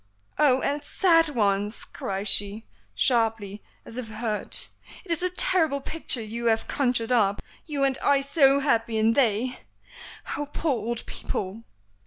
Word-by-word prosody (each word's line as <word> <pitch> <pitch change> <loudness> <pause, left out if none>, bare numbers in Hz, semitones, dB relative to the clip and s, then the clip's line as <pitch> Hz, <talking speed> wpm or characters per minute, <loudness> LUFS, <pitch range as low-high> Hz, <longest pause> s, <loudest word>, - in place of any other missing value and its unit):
"Oh! 265 -3 +4
and 290 +1 -1
sad 330 0 +3
ones!" 205 -4 -1
cries 195 +1 -5
she, 205 +2 +2 0.3
sharply, 225 -5 0 0.2
as 230 - -7
if 245 - -6
hurt. 215 -1 -3 0.4
"It 350 - -7
is 335 - 0
a 365 - +1
terrible 330 -5 +3
picture 275 -5 0
you 230 +2 -4
have 225 -1 +1
conjured 245 -3 0
up. 205 -5 +2 0.3
You 290 -3 -2
and 270 -1 +1
I 280 -1 +3
so 280 -1 +3
happy, 230 -5 +1
and 220 +1 +3
they 245 0 +1 0.8
Oh! 290 - -4
poor 320 0 -1
old 235 0 -4
people!" 205 +4 -5
235 Hz, 150 wpm, -25 LUFS, 220-280 Hz, 0.8 s, Oh